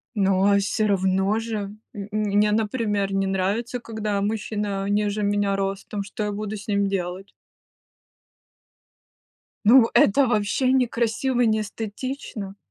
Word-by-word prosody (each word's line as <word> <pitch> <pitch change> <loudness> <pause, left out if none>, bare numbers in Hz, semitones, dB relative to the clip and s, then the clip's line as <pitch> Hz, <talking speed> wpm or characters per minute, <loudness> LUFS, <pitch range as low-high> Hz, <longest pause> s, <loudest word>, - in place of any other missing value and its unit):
Но 195 0 +3
всё 205 +2 0
равно 190 +1 +1
же 225 -1 -3 0.4
м 200 -2 -6
мне, 210 0 +2
например, 210 -2 0
не 195 0 +1
нравится, 200 +6 -1
когда 215 -3 -3
мужчина 205 -1 -2
ниже 205 0 0
меня 205 -1 +1
ростом, 195 +1 -3
что 205 +2 -5
я 210 - -2
буду 210 +1 -4
с 200 +1 -11
ним 200 -1 +1
делать? 190 0 -4 2.3
Ну 245 +5 +8
в - - -9
это 265 +7 +5
вообще 235 +3 +1
не 260 -1 +3
красиво 240 +2 0
и - - +4
не 220 -1 +2
эстетично. 215 -1 -6
205 Hz, 135 wpm, -24 LUFS, 200-220 Hz, 2.3 s, Ну